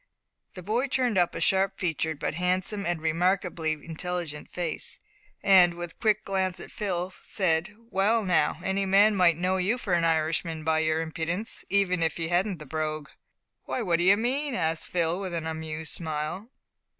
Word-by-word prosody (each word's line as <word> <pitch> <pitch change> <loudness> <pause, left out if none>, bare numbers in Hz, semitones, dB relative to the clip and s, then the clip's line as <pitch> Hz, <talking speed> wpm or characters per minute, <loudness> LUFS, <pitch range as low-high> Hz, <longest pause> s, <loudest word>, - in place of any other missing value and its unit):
The 185 - -8
boy 230 +8 0
turned 250 -6 +1
up 175 -1 +1
a - - -3
sharp 195 0 +2
featured, 160 -3 -1
but - - -2
handsome 185 +4 -1
and 175 -2 -1
remarkably 170 0 0
intelligent 165 0 -5
face, 175 -3 -3 0.4
and, 180 -3 +6
with 175 -1 -5
a - - -26
quick 215 -1 +2
glance 190 -1 -1
at - - -10
Phil, 185 -3 -2
said, 180 0 0
"Well, 225 0 +1
now, 175 -5 +2
any 195 +1 0
man 205 +2 +5
might 175 -4 +4
know 185 +2 +1
you 195 +6 +1
for 200 -7 -2
an 170 -1 +3
Irishman 160 0 0
by 160 0 +2
your 160 0 +1
impudence, 165 +6 -3
even 190 -3 +2
if 160 -1 +1
you 165 -1 -2
hadn't 180 +2 +1
the 155 - -10
brogue." 155 0 -3 0.6
"Why, 250 - -2
what 170 -4 +1
do - - +2
you 195 +3 +6
mean?" 265 +4 -1
asked 160 -2 -1
Phil, 170 0 0
with 185 -3 -4
an 165 -1 -3
amused 160 -1 -3
smile. 160 +6 -3
175 Hz, 180 wpm, -27 LUFS, 160-195 Hz, 0.6 s, and